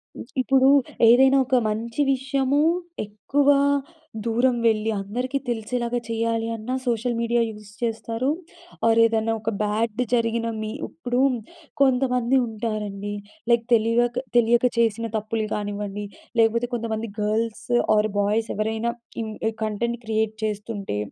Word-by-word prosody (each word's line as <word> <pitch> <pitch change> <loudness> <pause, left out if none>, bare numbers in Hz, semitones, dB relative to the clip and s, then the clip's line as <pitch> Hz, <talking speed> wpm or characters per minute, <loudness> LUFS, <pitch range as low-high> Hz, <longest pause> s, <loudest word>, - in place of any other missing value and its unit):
హ్మ్. - - -7 0.2
ఇప్పుడు 265 +1 +4 0.4
ఏదైనా 265 +3 +6
ఒక 260 - +1
మంచి 230 +5 -2
విషయము 270 +1 0 0.5
ఎక్కువ 215 +8 -1 0.8
దూరం 240 +2 +2
వెళ్ళి 220 0 +1
అందరికీ 250 +7 -2
తెలిసేలాగా 240 +1 -1
చేయాలి 230 0 -1
అన్నా 225 +4 -4
సోషల్ 235 0 0
మీడియా 235 0 +1
యూస్ 210 -1 -11
చేస్తారు. 230 +2 -1 0.6
ఆర్ 230 0 +4
ఏదన్నా 225 0 +2
ఒక 225 - -1
బ్యాడ్ 215 +2 -1
జరిగిన 230 -1 +1
మీ 215 - -3 0.2
ఇప్పుడు 250 -6 -3 0.6
కొంతమంది 250 -1 +3
ఉంటారండి 210 -2 -4 0.4
లైక్ 235 -1 +3
తెలివిక 240 +2 +2
తెలియక 240 +1 +4
చేసిన 230 0 +2
తప్పులు 215 +1 -2
కానివ్వండి, 205 0 -4 0.3
లేకపోతే 235 +2 +3
కొంతమంది 230 -1 -2
గర్ల్స్ 220 +1 -1 0.3
ఆర్ 210 0 +2
బాయ్స్ 215 +2 +1
ఎవరైనా 220 +2 -1 0.3
ఇన్ 220 - -5 0.3
కంటెంట్ 235 +3 -2
క్రియేట్ 220 0 0
చేస్తుంటే 205 - -3
230 Hz, 120 wpm, -24 LUFS, 215-240 Hz, 0.8 s, ఏదైనా